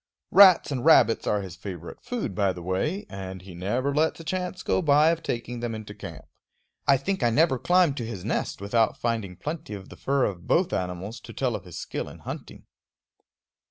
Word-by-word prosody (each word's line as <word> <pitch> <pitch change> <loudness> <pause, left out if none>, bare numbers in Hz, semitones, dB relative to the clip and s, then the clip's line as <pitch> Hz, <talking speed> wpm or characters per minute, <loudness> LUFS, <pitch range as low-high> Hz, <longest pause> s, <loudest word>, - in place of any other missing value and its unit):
Rats 190 -6 +7
and 130 -3 -2
rabbits 150 -7 +5
are 105 -1 +1
his 90 -3 -8
favorite 90 -3 -8
food, 235 - -3
by 100 -1 +1
the 90 - -9
way, 150 - -1
and 95 -1 -7
he 95 -1 -10
never 120 +11 -1
lets 155 +3 +1
a - - -8
chance 180 +1 -3
go - - +1
by 150 0 +5
of 165 0 -2
taking 120 0 -4
them 120 -1 -3
into 110 -1 -8
camp. 85 -8 -9 0.6
I 140 -1 +6
think 190 +7 -2
I 120 - +4
never 135 +1 +3
climbed 175 -4 +3
to 120 - -3
his 105 -6 -6
nest - - -2
without 110 +2 +1
finding 110 -6 -2
plenty 150 - -5
of 95 -1 -10
the - - -11
fur 140 -1 +1
of 90 -4 -5
both 180 +1 +2
animals 95 +5 -3
to - - -11
tell - - -1
of - - -7
his - - -9
skill - - -4
in - - -12
hunting. - - -8
120 Hz, 205 wpm, -26 LUFS, 95-155 Hz, 0.6 s, Rats